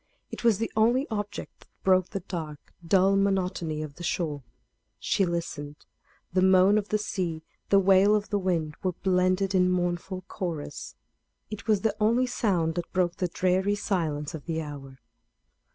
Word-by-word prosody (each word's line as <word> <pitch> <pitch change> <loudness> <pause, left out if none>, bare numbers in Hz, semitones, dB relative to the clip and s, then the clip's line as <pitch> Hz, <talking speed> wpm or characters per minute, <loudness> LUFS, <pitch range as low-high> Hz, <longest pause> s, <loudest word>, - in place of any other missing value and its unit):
It - - -7
was 230 -4 +4
the 225 +2 -3
only 240 +5 +3
object 205 -1 -5
that - - -25
broke 185 -1 +3
the 195 - -4
dark, 160 -5 -7
dull 190 +3 +4
monotony 185 -5 0
of 145 -2 -9
the 175 - -8
shore. 155 -4 -2 0.6
She 195 - +1
listened; 150 -4 -5 0.5
the 185 - +3
moan 190 +2 +5
of 205 - -7
the 215 - +2
sea, 180 -6 -3 0.3
the 200 - +5
wail 195 +2 +5
of 205 0 -2
the 205 - +1
wind, 170 -5 -1
were 185 -1 -1
blended 185 +1 +1
in 180 -1 +4
mournful 180 +1 -1
chorus. 175 -8 -5 0.6
It 215 +2 -7
was 210 -3 +3
the 220 -2 0
only 230 +4 +3
sound 190 -10 0
that 175 +1 -5
broke 180 -2 +1
the 180 - 0
dreary 185 +3 +1
silence 160 -8 -2
of 155 -3 -7
the 165 -1 -2
hour. 140 -4 -8
185 Hz, 170 wpm, -27 LUFS, 165-200 Hz, 0.6 s, moan